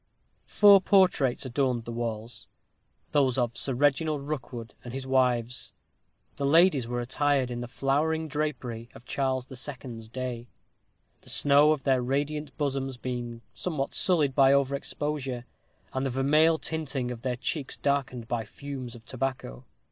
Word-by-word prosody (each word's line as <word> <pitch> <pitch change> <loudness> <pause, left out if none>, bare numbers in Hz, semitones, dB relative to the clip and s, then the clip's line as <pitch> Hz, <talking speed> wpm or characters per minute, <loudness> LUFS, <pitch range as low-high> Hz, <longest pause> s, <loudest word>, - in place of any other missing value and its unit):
Four 200 -2 +7
portraits 180 - +3
adorned 125 -2 0
the 120 - -5
walls: 115 0 -5 0.6
those 135 -3 +3
of 120 -2 0
Sir 135 - -1
Reginald 145 +2 +1
Rookwood 125 -5 -5
and 120 +1 -7
his 135 -1 -4
wives. 125 -2 +1 0.6
The 140 - -1
ladies 155 -5 +5
were 120 0 -2
attired 130 +1 +1
in 120 0 -4
the 120 - -5
flowing 150 +5 0
drapery 130 -6 -3
of 130 -2 -13
Charles 130 -2 -1
the 130 - -10
Second's 125 -4 -6
day, 125 -1 -5 0.7
the - - -13
snow 145 +1 +5
of 150 -3 -1
their 130 -3 +3
radiant 145 +3 -2
bosoms 135 -3 -2
being 120 -2 -5
somewhat 150 -6 -3
sullied 155 -7 +2
by 135 0 +5
over 140 0 +2
exposure, 140 -3 -3 0.5
and 130 - -1
the 135 - 0
vermeil 150 +5 +3
tinting 145 -6 -3
of 120 -2 -7
their 125 -1 -1
cheeks 135 +3 -3
darkened 135 -4 -1
by 120 -1 -1
the - - -11
fumes 135 -4 -7
of 115 -1 -14
tobacco. 125 - -4
135 Hz, 155 wpm, -28 LUFS, 120-145 Hz, 0.7 s, Four